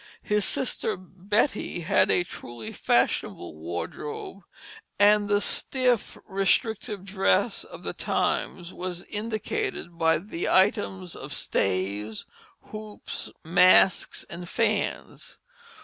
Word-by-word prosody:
His 210 Hz, -1 st, +1 dB
sister 220 Hz, -5 st, 0 dB
Betty 190 Hz, +2 st, -1 dB
had 165 Hz, -, +3 dB
a 175 Hz, -, +3 dB
truly 120 Hz, -9 st, -8 dB
fashionable 85 Hz, -, 0 dB
wardrobe, 85 Hz, -, -5 dB, 0.6 s
and 205 Hz, 0 st, +5 dB
the 205 Hz, 0 st, +4 dB
stiff, 250 Hz, +1 st, +2 dB
restrictive 195 Hz, +1 st, 0 dB
dress 190 Hz, -, +1 dB
of -, -, -12 dB
the -, -, -3 dB
times 175 Hz, 0 st, -1 dB
was 180 Hz, -1 st, -5 dB
indicated 215 Hz, -, -4 dB
by 165 Hz, 0 st, +4 dB
the 170 Hz, 0 st, -4 dB
items 190 Hz, -2 st, +2 dB
of 135 Hz, +1 st, -7 dB
stays, 100 Hz, +3 st, -1 dB, 0.5 s
hoops, 215 Hz, -1 st, -6 dB, 0.2 s
masks, 180 Hz, +2 st, +5 dB
and 175 Hz, 0 st, -8 dB
fans. 230 Hz, -, -2 dB
190 Hz, 100 wpm, -26 LUFS, 165-210 Hz, 0.6 s, and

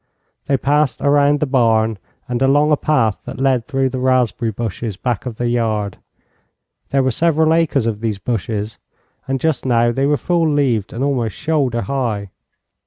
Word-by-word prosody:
They 140 Hz, -, +2 dB
passed 145 Hz, +2 st, +1 dB
around 145 Hz, 0 st, +3 dB
the -, -, +3 dB
barn 115 Hz, -5 st, +2 dB, 0.3 s
and 125 Hz, 0 st, -2 dB
along 145 Hz, +3 st, +3 dB
a -, -, +6 dB
path 130 Hz, -9 st, 0 dB
that -, -, -7 dB
led 130 Hz, -3 st, +1 dB
through 135 Hz, -2 st, 0 dB
the 130 Hz, 0 st, -4 dB
raspberry 125 Hz, -3 st, +1 dB
bushes 110 Hz, -1 st, -4 dB
back 125 Hz, +1 st, -2 dB
of 120 Hz, -, -5 dB
the 120 Hz, +2 st, -2 dB
yard. 110 Hz, -4 st, -1 dB, 0.9 s
There 135 Hz, -1 st, +2 dB
were 130 Hz, -, +1 dB
several 160 Hz, +3 st, +2 dB
acres 160 Hz, -7 st, +1 dB
of 110 Hz, -2 st, -2 dB
these 110 Hz, -3 st, -1 dB
bushes, 110 Hz, 0 st, -3 dB, 0.5 s
and 135 Hz, 0 st, -1 dB
just 160 Hz, -1 st, 0 dB
now 120 Hz, -2 st, +2 dB
they 135 Hz, +3 st, 0 dB
were 145 Hz, 0 st, +2 dB
full 170 Hz, -1 st, +1 dB
leaved 125 Hz, -9 st, 0 dB
and 120 Hz, -, -3 dB
almost 125 Hz, -7 st, -1 dB
shoulder 140 Hz, -7 st, 0 dB
high. 105 Hz, -4 st, -2 dB
130 Hz, 175 wpm, -18 LUFS, 115-140 Hz, 0.9 s, a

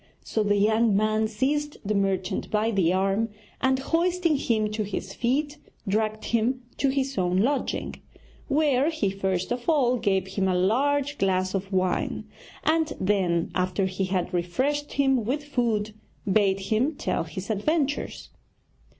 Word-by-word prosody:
So 220 Hz, -, -1 dB
the 205 Hz, -1 st, +2 dB
young 220 Hz, +1 st, +3 dB
man 215 Hz, +1 st, +2 dB
seized 290 Hz, +7 st, -1 dB
the 210 Hz, -, 0 dB
merchant 195 Hz, -2 st, -1 dB
by 215 Hz, +1 st, +1 dB
the 185 Hz, -5 st, +2 dB
arm, 195 Hz, +4 st, +1 dB, 0.3 s
and 265 Hz, 0 st, +3 dB
hoisting 335 Hz, +3 st, +1 dB
him 220 Hz, -5 st, 0 dB
to 215 Hz, 0 st, -2 dB
his 195 Hz, -1 st, -4 dB
feet, 290 Hz, +5 st, -1 dB, 0.3 s
dragged 215 Hz, +2 st, 0 dB
him 240 Hz, +3 st, 0 dB
to 275 Hz, -, +2 dB
his 270 Hz, -2 st, -1 dB
own 180 Hz, 0 st, +1 dB
lodging; 265 Hz, +8 st, -1 dB, 0.5 s
where 285 Hz, -1 st, +2 dB
he 230 Hz, -12 st, -1 dB
first 190 Hz, 0 st, -2 dB
of 245 Hz, +5 st, -2 dB
all 255 Hz, -6 st, +3 dB
gave 195 Hz, -4 st, +1 dB
him 190 Hz, 0 st, 0 dB
a 185 Hz, -, +1 dB
large 280 Hz, +9 st, +1 dB
glass 185 Hz, -1 st, +1 dB
of 195 Hz, 0 st, -3 dB
wine, 185 Hz, -1 st, 0 dB, 0.4 s
and 320 Hz, -1 st, +2 dB
then, 185 Hz, -4 st, +1 dB
after 185 Hz, +1 st, 0 dB
he 190 Hz, +1 st, -1 dB
had 185 Hz, -1 st, -2 dB
refreshed 260 Hz, +13 st, -1 dB
him 270 Hz, -4 st, +2 dB
with 275 Hz, +7 st, -2 dB
food, 230 Hz, -7 st, -1 dB, 0.3 s
bade 195 Hz, -1 st, +2 dB
him 225 Hz, +10 st, 0 dB
tell -, -, -1 dB
his 185 Hz, +5 st, -5 dB
adventures. 290 Hz, +7 st, -1 dB
215 Hz, 150 wpm, -26 LUFS, 195-275 Hz, 0.5 s, young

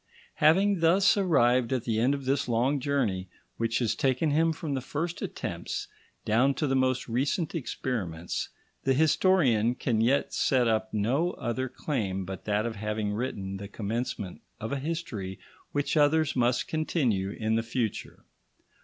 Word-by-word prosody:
Having 190 Hz, +5 st, +4 dB
thus 180 Hz, +4 st, +5 dB
arrived 130 Hz, -, +3 dB
at 130 Hz, -3 st, 0 dB
the 115 Hz, -3 st, 0 dB
end 130 Hz, +5 st, +3 dB
of 140 Hz, -2 st, -7 dB
this 135 Hz, 0 st, +1 dB
long 125 Hz, +5 st, +2 dB
journey, 115 Hz, -10 st, 0 dB, 0.3 s
which 115 Hz, -1 st, 0 dB
has 120 Hz, -4 st, +1 dB
taken 135 Hz, +2 st, +1 dB
him 165 Hz, +3 st, +3 dB
from 155 Hz, -1 st, -4 dB
the 135 Hz, -, -1 dB
first 160 Hz, +6 st, -4 dB
attempts -, -, -4 dB, 0.4 s
down 125 Hz, +6 st, +3 dB
to 150 Hz, -, -1 dB
the 135 Hz, -2 st, +1 dB
most 130 Hz, -1 st, +1 dB
recent 140 Hz, -, -1 dB
experiments, 100 Hz, -, -3 dB, 0.3 s
the 135 Hz, 0 st, +2 dB
historian 140 Hz, -, +3 dB
can 115 Hz, -4 st, 0 dB
yet 130 Hz, +5 st, +2 dB
set 125 Hz, -3 st, +2 dB
up 110 Hz, -1 st, 0 dB
no 130 Hz, -, +1 dB
other 130 Hz, +2 st, -3 dB
claim 95 Hz, -12 st, -2 dB
but 95 Hz, +1 st, -7 dB
that 105 Hz, +1 st, +1 dB
of 115 Hz, -2 st, -4 dB
having 105 Hz, 0 st, -2 dB
written 100 Hz, -4 st, -3 dB
the 100 Hz, +1 st, -7 dB
commencement 105 Hz, -2 st, -4 dB, 0.2 s
of 110 Hz, -, -5 dB
a 140 Hz, -, -1 dB
history 130 Hz, -, -4 dB, 0.3 s
which 145 Hz, +2 st, -1 dB
others 155 Hz, 0 st, +3 dB
must 120 Hz, -1 st, +1 dB
continue 130 Hz, -, 0 dB
in 110 Hz, +2 st, -2 dB
the 115 Hz, -, +2 dB
future. 115 Hz, -1 st, -4 dB
125 Hz, 160 wpm, -28 LUFS, 110-145 Hz, 0.4 s, thus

